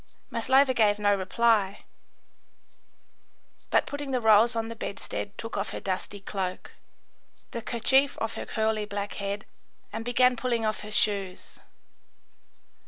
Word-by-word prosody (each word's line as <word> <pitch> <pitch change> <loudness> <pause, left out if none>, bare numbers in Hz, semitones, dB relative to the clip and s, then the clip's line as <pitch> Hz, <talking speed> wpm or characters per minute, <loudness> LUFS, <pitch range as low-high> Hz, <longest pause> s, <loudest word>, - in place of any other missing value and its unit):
Maslova 260 +3 +3
gave 210 -4 +3
no 205 -1 +3
reply, 200 +1 +1 1.9
but - - +3
putting 285 -1 -5
the 255 -1 +1
rolls 220 +1 +5
on 225 0 -1
the 230 - -6
bedstead, 205 -1 -5
took 225 - -6
off 200 +2 -2
her - - -5
dusty 195 +1 -4
cloak, 190 -2 -4 0.8
the 235 - -4
kerchief 265 +5 +2
off 225 0 -2
her - - -6
curly 220 -1 0
black 205 0 -4
head, 200 +1 -3 0.5
and 225 - -3
began 250 +1 +4
pulling 235 -2 -1
off 215 0 -1
her 210 - -8
shoes. 200 -3 -1
220 Hz, 135 wpm, -27 LUFS, 205-235 Hz, 1.9 s, rolls